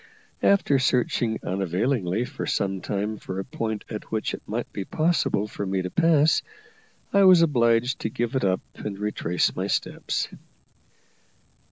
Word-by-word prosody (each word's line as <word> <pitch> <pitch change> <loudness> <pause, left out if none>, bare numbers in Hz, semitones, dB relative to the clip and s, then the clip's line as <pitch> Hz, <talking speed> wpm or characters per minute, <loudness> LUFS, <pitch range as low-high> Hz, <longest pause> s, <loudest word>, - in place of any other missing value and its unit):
After 190 -9 +3
searching 120 -3 +1
unavailingly 95 +3 0
for 125 - -6
some 95 -1 -1
time 105 +2 -2
for 95 -1 -6
a 95 - -3
point 110 -2 -4
at 105 -2 -6
which 110 -1 -2
it - - -5
might - - -4
be 100 - -3
possible 155 - +1
for 105 - -5
me 95 -1 -1
to 90 - -4
pass, 160 -2 +4 0.7
I 200 0 +5
was 180 -3 +8
obliged 120 -4 +2
to 110 - -2
give 120 0 -2
it 130 - +1
up 95 -1 +1
and 100 -2 -6
retrace 100 -4 0
my - - -2
steps. - - -1
110 Hz, 155 wpm, -25 LUFS, 100-130 Hz, 0.7 s, was